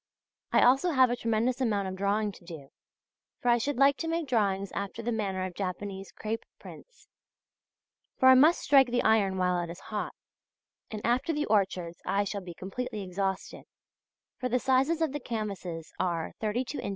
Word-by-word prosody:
I -, -, +5 dB
also 270 Hz, +8 st, +4 dB
have 260 Hz, -2 st, +5 dB
a -, -, +1 dB
tremendous 235 Hz, +2 st, 0 dB
amount 205 Hz, -5 st, 0 dB
of 190 Hz, -, -4 dB
drawing 205 Hz, +2 st, 0 dB
to 190 Hz, -, -16 dB
do; 160 Hz, -6 st, -10 dB, 0.7 s
for 245 Hz, -, 0 dB
I 240 Hz, 0 st, +4 dB
should 285 Hz, +4 st, -2 dB
like 275 Hz, +1 st, +5 dB
to 330 Hz, -, -4 dB
make 330 Hz, -1 st, -1 dB
drawings 200 Hz, -5 st, 0 dB
after 200 Hz, +3 st, -5 dB
the 240 Hz, -, -1 dB
manner 195 Hz, -4 st, -2 dB
of 185 Hz, -, -6 dB
Japanese 195 Hz, +1 st, -5 dB
crape 220 Hz, +1 st, -4 dB
prints. -, -, -14 dB, 1.1 s
For 260 Hz, -, +4 dB
I -, -, +10 dB
must 300 Hz, +7 st, +5 dB
strike 270 Hz, -2 st, +5 dB
the 245 Hz, 0 st, 0 dB
iron 205 Hz, -4 st, +3 dB
while 180 Hz, -1 st, +1 dB
it 170 Hz, -, -6 dB
is 170 Hz, +2 st, -8 dB
hot, 210 Hz, -, -3 dB, 0.7 s
and 215 Hz, -1 st, -6 dB
after 245 Hz, +7 st, +1 dB
the 300 Hz, 0 st, -1 dB
orchards 190 Hz, -5 st, 0 dB
I 200 Hz, +1 st, +1 dB
shall 200 Hz, 0 st, -4 dB
be 175 Hz, -2 st, -9 dB
completely 205 Hz, +3 st, -5 dB
exhausted, 190 Hz, +1 st, -3 dB, 0.7 s
for 255 Hz, -, -2 dB
the 250 Hz, -, +2 dB
sizes 270 Hz, +6 st, +2 dB
of 315 Hz, -, 0 dB
the 290 Hz, -, -4 dB
canvases 200 Hz, -, -5 dB
are, 170 Hz, -3 st, -1 dB
32 240 Hz, +6 st, -2 dB
in. -, -, -4 dB
215 Hz, 185 wpm, -29 LUFS, 190-255 Hz, 1.1 s, I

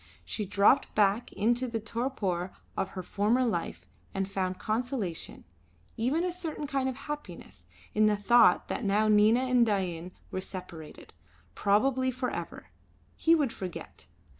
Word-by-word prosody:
She 210 Hz, -3 st, -3 dB
dropped 205 Hz, +8 st, +3 dB
back 210 Hz, +2 st, +2 dB
into 240 Hz, +4 st, +1 dB
the 230 Hz, -2 st, -2 dB
torpor 210 Hz, -6 st, -2 dB, 0.2 s
of 195 Hz, -, -1 dB
her 185 Hz, -, -3 dB
former 220 Hz, +8 st, +1 dB
life 210 Hz, -8 st, -3 dB, 0.3 s
and 195 Hz, -1 st, -1 dB
found 185 Hz, -2 st, -2 dB
consolation 220 Hz, -6 st, -3 dB, 0.5 s
even 265 Hz, +9 st, 0 dB
a 360 Hz, -, 0 dB
certain 325 Hz, -4 st, -5 dB
kind 275 Hz, -2 st, -1 dB
of 260 Hz, -, -4 dB
happiness 180 Hz, -, -8 dB, 0.3 s
in 215 Hz, 0 st, +4 dB
the 210 Hz, -1 st, +2 dB
thought 205 Hz, -2 st, +5 dB
that -, -, -3 dB
now 210 Hz, +1 st, +2 dB
Nina 215 Hz, +3 st, +5 dB
and 255 Hz, -2 st, +3 dB
Dain 185 Hz, -5 st, -1 dB, 0.2 s
were 185 Hz, -, -3 dB
separated, 180 Hz, -5 st, -9 dB, 0.4 s
probably 260 Hz, -, +2 dB
for 255 Hz, 0 st, -2 dB
ever. -, -, -7 dB, 0.4 s
He 330 Hz, +1 st, +4 dB
would 285 Hz, -7 st, 0 dB
forget. 180 Hz, -, -8 dB
215 Hz, 145 wpm, -29 LUFS, 190-255 Hz, 0.5 s, thought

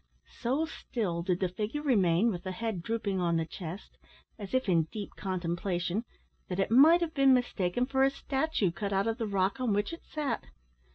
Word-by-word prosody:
So 270 Hz, +7 st, +1 dB
still 210 Hz, -, -3 dB
did 180 Hz, +1 st, -1 dB
the 185 Hz, -, +3 dB
figure 215 Hz, +10 st, -3 dB
remain, 205 Hz, -, +3 dB
with 175 Hz, -3 st, -4 dB
the 185 Hz, -, -4 dB
head 220 Hz, -3 st, -3 dB
drooping 205 Hz, -1 st, -2 dB
on 170 Hz, -1 st, +2 dB
the 165 Hz, -, 0 dB
chest, 175 Hz, +3 st, -8 dB, 0.4 s
as 200 Hz, -2 st, -7 dB
if 260 Hz, -2 st, +1 dB
in 165 Hz, -4 st, +3 dB
deep 210 Hz, -2 st, -6 dB
contemplation, 180 Hz, +2 st, -2 dB, 0.4 s
that 180 Hz, 0 st, -3 dB
it 195 Hz, -, +1 dB
might 310 Hz, +8 st, +7 dB
have 330 Hz, -2 st, -1 dB
been 275 Hz, -3 st, +5 dB
mistaken 240 Hz, -2 st, 0 dB
for 265 Hz, 0 st, 0 dB
a 270 Hz, -, +5 dB
statue, 270 Hz, -, -1 dB
cut 200 Hz, +3 st, -3 dB
out 195 Hz, +1 st, +2 dB
of 225 Hz, +2 st, -1 dB
the 225 Hz, -, -1 dB
rock 195 Hz, +2 st, 0 dB
on 245 Hz, -5 st, +1 dB
which 205 Hz, +8 st, 0 dB
it 335 Hz, -, -8 dB
sat. 290 Hz, -7 st, -3 dB
210 Hz, 195 wpm, -30 LUFS, 180-255 Hz, 0.4 s, might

